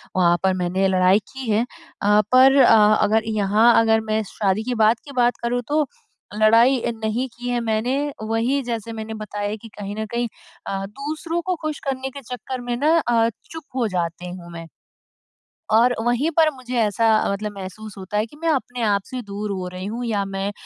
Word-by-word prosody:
वहाँ 175 Hz, -2 st, +4 dB
पर 190 Hz, -1 st, +3 dB
मैंने 185 Hz, +1 st, 0 dB
लड़ाई 185 Hz, +1 st, +4 dB
की 265 Hz, -4 st, -6 dB
है 220 Hz, +3 st, +2 dB, 0.4 s
अ, 210 Hz, +1 st, +4 dB
पर 265 Hz, +2 st, +7 dB
अ, 215 Hz, -2 st, +6 dB
अगर 215 Hz, +1 st, +2 dB
यहाँ 215 Hz, +2 st, +3 dB
अगर 220 Hz, 0 st, +3 dB
मैं 220 Hz, -, +2 dB
शादी 205 Hz, 0 st, 0 dB
के 250 Hz, +1 st, -2 dB
बाद 225 Hz, +1 st, +3 dB
की 285 Hz, -, -10 dB
बात 245 Hz, 0 st, +3 dB
करूँ 245 Hz, +1 st, 0 dB
तो, 300 Hz, 0 st, +2 dB, 0.5 s
लड़ाई 230 Hz, +4 st, +5 dB, 0.2 s
नहीं 230 Hz, +4 st, -1 dB
की 245 Hz, 0 st, -5 dB
है 245 Hz, -1 st, 0 dB
मैंने 225 Hz, +3 st, 0 dB, 0.3 s
वही 230 Hz, +5 st, 0 dB
जैसे 230 Hz, -2 st, -4 dB
मैंने 220 Hz, 0 st, -6 dB
बताया 210 Hz, -1 st, -4 dB
कि 225 Hz, +1 st, -12 dB
कहीं 205 Hz, 0 st, -5 dB
न 220 Hz, -, -2 dB
कहीं 240 Hz, 0 st, -1 dB, 0.4 s
अ, 195 Hz, 0 st, -3 dB
दूसरों 305 Hz, -, -4 dB
को 365 Hz, +1 st, -1 dB
खुश 310 Hz, -2 st, -3 dB
करने 265 Hz, 0 st, -3 dB
के 280 Hz, +1 st, -10 dB
चक्कर 250 Hz, +1 st, -6 dB
में 245 Hz, 0 st, -3 dB
ना 310 Hz, +5 st, +3 dB
अ, 230 Hz, -4 st, +2 dB, 0.2 s
चुप 320 Hz, -1 st, -7 dB
हो 240 Hz, -4 st, +1 dB
जाती 175 Hz, -1 st, -3 dB
हूँ 175 Hz, -1 st, -11 dB
मैं। 165 Hz, -1 st, -8 dB, 1.0 s
और 235 Hz, +3 st, +4 dB
वहीं 245 Hz, +7 st, +1 dB
पर 320 Hz, -1 st, +5 dB
मुझे 255 Hz, -1 st, -8 dB
ऐसा 225 Hz, +1 st, +2 dB, 0.2 s
मतलब 210 Hz, +1 st, -4 dB
महसूस 200 Hz, +2 st, -8 dB
होता 190 Hz, +2 st, -5 dB
है 215 Hz, -, 0 dB
कि 295 Hz, -, -17 dB
मैं 330 Hz, -, 0 dB
अपने 250 Hz, -5 st, -1 dB
आप 205 Hz, -3 st, +2 dB
से 255 Hz, -1 st, -5 dB
दूर 205 Hz, 0 st, -5 dB
हो 185 Hz, -2 st, -3 dB
रही 185 Hz, +1 st, -6 dB
हूँ 235 Hz, +4 st, -4 dB
या 205 Hz, -3 st, 0 dB
मैं 195 Hz, +1 st, -3 dB
225 Hz, 200 wpm, -22 LUFS, 205-250 Hz, 1.0 s, पर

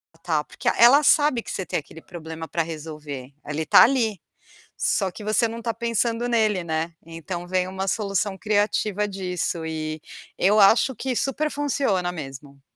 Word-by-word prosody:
está, 165 Hz, -2 st, -1 dB
porque -, -, -8 dB
ela 245 Hz, +5 st, +7 dB
sabe 290 Hz, -4 st, +4 dB
que -, -, -11 dB
você 190 Hz, -, -3 dB
tem -, -, -1 dB
aquele 160 Hz, +2 st, -13 dB
problema 160 Hz, -2 st, -8 dB
para 170 Hz, -, -1 dB
resolver, 150 Hz, -4 st, -8 dB
ele 150 Hz, +2 st, -2 dB
está -, -, +7 dB
ali. 230 Hz, -7 st, +1 dB, 0.6 s
Só 195 Hz, -4 st, +1 dB
que 210 Hz, -, -10 dB
você 215 Hz, +2 st, +3 dB
não 230 Hz, +1 st, -6 dB
está 230 Hz, 0 st, -2 dB
pensando 235 Hz, +1 st, -1 dB
nele, 215 Hz, -6 st, +1 dB
né. 160 Hz, 0 st, -2 dB
Então 170 Hz, +2 st, -7 dB
vem 185 Hz, 0 st, 0 dB
uma 190 Hz, +1 st, -4 dB
solução 200 Hz, -1 st, -1 dB
criativa 210 Hz, 0 st, 0 dB
disso 180 Hz, -3 st, -3 dB
e 155 Hz, -1 st, -4 dB, 0.4 s
eu 205 Hz, +3 st, +3 dB
acho 225 Hz, +6 st, +5 dB
que 255 Hz, +3 st, -3 dB
super 285 Hz, +5 st, -1 dB
funciona 270 Hz, -11 st, 0 dB
mesmo. 140 Hz, -3 st, -9 dB
190 Hz, 165 wpm, -24 LUFS, 160-225 Hz, 0.6 s, ela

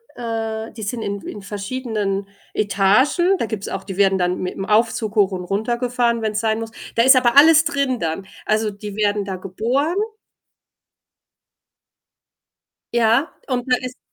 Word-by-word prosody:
äh 225 Hz, -1 st, -4 dB
die 220 Hz, -, -8 dB
sind 225 Hz, +3 st, -3 dB
in 200 Hz, -2 st, -3 dB
in 205 Hz, -, -7 dB
verschiedenen 205 Hz, -1 st, -3 dB, 0.3 s
Etagen. 215 Hz, -, +3 dB
Da -, -, 0 dB
gibt's 210 Hz, -3 st, -5 dB
auch 195 Hz, -, -4 dB
die 190 Hz, -2 st, -7 dB
werden 195 Hz, -1 st, +4 dB
dann 180 Hz, 0 st, 0 dB
mit 180 Hz, -, -4 dB
'm 195 Hz, -, -4 dB
Aufzug 220 Hz, 0 st, +1 dB
hoch 205 Hz, -2 st, +4 dB
und 185 Hz, -1 st, -4 dB
runtergefahren, 235 Hz, +4 st, 0 dB
wenn's 215 Hz, -1 st, -1 dB
sein 220 Hz, 0 st, 0 dB
muss. 225 Hz, 0 st, -6 dB, 0.2 s
Da 230 Hz, -, +4 dB
ist 265 Hz, +2 st, +7 dB
aber 255 Hz, 0 st, +3 dB
alles 315 Hz, +2 st, +8 dB
drin 280 Hz, -6 st, 0 dB
dann. 165 Hz, +4 st, -3 dB, 0.2 s
Also 215 Hz, 0 st, +1 dB
die 205 Hz, 0 st, -8 dB
werden 205 Hz, -1 st, 0 dB
da 190 Hz, -1 st, -4 dB
geboren. 240 Hz, -, -1 dB, 3.0 s
Ja, 235 Hz, +5 st, +2 dB
und 245 Hz, -2 st, -1 dB
da -, -, +7 dB
ist 250 Hz, 0 st, -7 dB
220 Hz, 155 wpm, -20 LUFS, 200-245 Hz, 3.0 s, alles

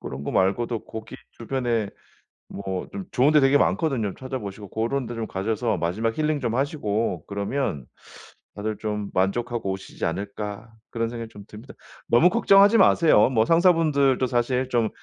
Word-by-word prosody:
그런 65 Hz, +1 st, -7 dB
거 -, -, -3 dB
말고도 110 Hz, +5 st, 0 dB
거기 110 Hz, -1 st, -8 dB, 0.2 s
주변에 120 Hz, -3 st, -2 dB, 0.6 s
뭐 95 Hz, -2 st, -5 dB
좀 195 Hz, -, -5 dB
좋은 140 Hz, +4 st, +3 dB
데 150 Hz, -, +6 dB
되게 135 Hz, +1 st, +5 dB
많거든요. 130 Hz, -, 0 dB
'찾아보시고 105 Hz, -6 st, -7 dB
고런 120 Hz, +6 st, -2 dB
데 120 Hz, -, -6 dB
좀 115 Hz, -1 st, -4 dB
가셔서 110 Hz, +3 st, -1 dB
마지막 100 Hz, +7 st, -2 dB
힐링 155 Hz, -1 st, 0 dB
좀 120 Hz, -4 st, -2 dB
하시고 120 Hz, -6 st, -1 dB
그러면 100 Hz, -, -3 dB, 0.7 s
다들 105 Hz, 0 st, -4 dB
좀 105 Hz, -2 st, -4 dB
만족하고 115 Hz, +3 st, -1 dB
오시지 95 Hz, 0 st, -8 dB
않을까.' 105 Hz, +4 st, -5 dB, 0.2 s
그런 115 Hz, 0 st, -2 dB
생각이 115 Hz, -1 st, -6 dB
좀 105 Hz, -2 st, -13 dB
듭니다. 110 Hz, +6 st, -12 dB, 0.3 s
너무 160 Hz, +10 st, +5 dB
걱정하지 205 Hz, 0 st, +5 dB
마세요. 155 Hz, -, +5 dB
뭐 115 Hz, -4 st, +2 dB
상사분들도 155 Hz, -6 st, +3 dB
사실 125 Hz, +1 st, 0 dB
좀 115 Hz, -3 st, +1 dB
115 Hz, 345 characters per minute, -24 LUFS, 105-135 Hz, 0.7 s, 데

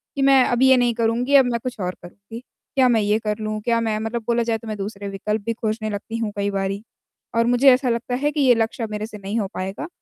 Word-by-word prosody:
कि 275 Hz, -, -2 dB
मैं 270 Hz, -1 st, +6 dB
अब 245 Hz, 0 st, 0 dB
ये 265 Hz, -1 st, +6 dB
नहीं 245 Hz, -1 st, +2 dB
करूँगी, 240 Hz, +4 st, +1 dB
अब 270 Hz, -2 st, +7 dB
मैं 235 Hz, -1 st, -1 dB
कुछ 250 Hz, -4 st, -5 dB
और 180 Hz, -1 st, -3 dB
करूँगी। 200 Hz, +6 st, -11 dB, 0.4 s
क्या 260 Hz, -2 st, +5 dB
मैं 225 Hz, -3 st, +3 dB
ये 210 Hz, +1 st, +2 dB
कर 210 Hz, -1 st, -2 dB
लूँ? 215 Hz, 0 st, -3 dB
क्या 230 Hz, +1 st, +1 dB
मैं 220 Hz, -2 st, -1 dB
मतलब 225 Hz, +1 st, -3 dB
बोला 235 Hz, 0 st, +2 dB
जाए 225 Hz, -1 st, 0 dB
तो 225 Hz, -, -12 dB
मैं 215 Hz, -, -4 dB
दूसरे 200 Hz, 0 st, -6 dB
विकल्प 210 Hz, +2 st, -3 dB
भी 230 Hz, -, 0 dB
खोजने 220 Hz, -1 st, -3 dB
लगती 215 Hz, +2 st, -5 dB
हूँ 220 Hz, -2 st, -2 dB
कई 200 Hz, 0 st, 0 dB
बारी। 195 Hz, +1 st, -2 dB, 0.5 s
और 230 Hz, 0 st, +3 dB
मुझे 245 Hz, +3 st, +5 dB
ऐसा 255 Hz, 0 st, +1 dB
लगता 235 Hz, +1 st, -1 dB
है 295 Hz, -, +2 dB
कि 300 Hz, -, -1 dB
ये 255 Hz, -3 st, +5 dB
लक्ष्य 225 Hz, +1 st, -1 dB
अ, 225 Hz, -, -2 dB
मेरे 210 Hz, 0 st, -3 dB
से 210 Hz, -, -10 dB
नहीं 200 Hz, +3 st, -3 dB
हो 200 Hz, -, -1 dB
पाएगा 195 Hz, -, -4 dB
225 Hz, 270 wpm, -22 LUFS, 210-245 Hz, 0.5 s, अब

